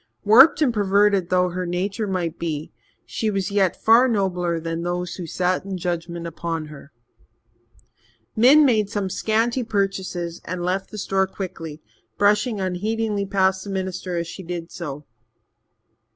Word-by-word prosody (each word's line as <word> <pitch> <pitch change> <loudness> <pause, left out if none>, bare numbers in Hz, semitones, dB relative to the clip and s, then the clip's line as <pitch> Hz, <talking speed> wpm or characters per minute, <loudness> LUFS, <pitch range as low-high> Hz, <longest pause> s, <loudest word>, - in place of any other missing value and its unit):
Warped 265 +9 +7
and 250 -5 +2
perverted 200 -2 +2
though 180 0 +2
her 180 0 -4
nature 195 +5 -2
might 175 -4 -2
be, 155 -3 -4 0.3
she 220 - -2
was 195 -1 -2
yet 195 -3 +1
far 230 +3 +6
nobler 180 -6 0
than 165 0 -4
those 175 +1 -3
who 175 -3 -6
sat 180 +3 0
in 195 -1 -5
judgement 170 -1 -4
upon 165 -1 -4
her. 140 0 -13 1.4
Min 275 +7 +6
made 215 -6 +2
some 200 -2 -2
scanty 230 +5 0
purchases 190 -5 -2
and 180 0 -5
left 190 +2 -1
the 215 - -9
store 190 -1 0
quickly, 165 -5 -7 0.3
brushing 210 +2 +2
unheedingly 205 +2 -1
past 190 -1 +1
the 200 - -8
minister 185 -2 -3
as 170 - -1
she 170 - -8
did 170 -1 -6
so. 150 -4 -7
190 Hz, 150 wpm, -22 LUFS, 175-205 Hz, 1.4 s, Warped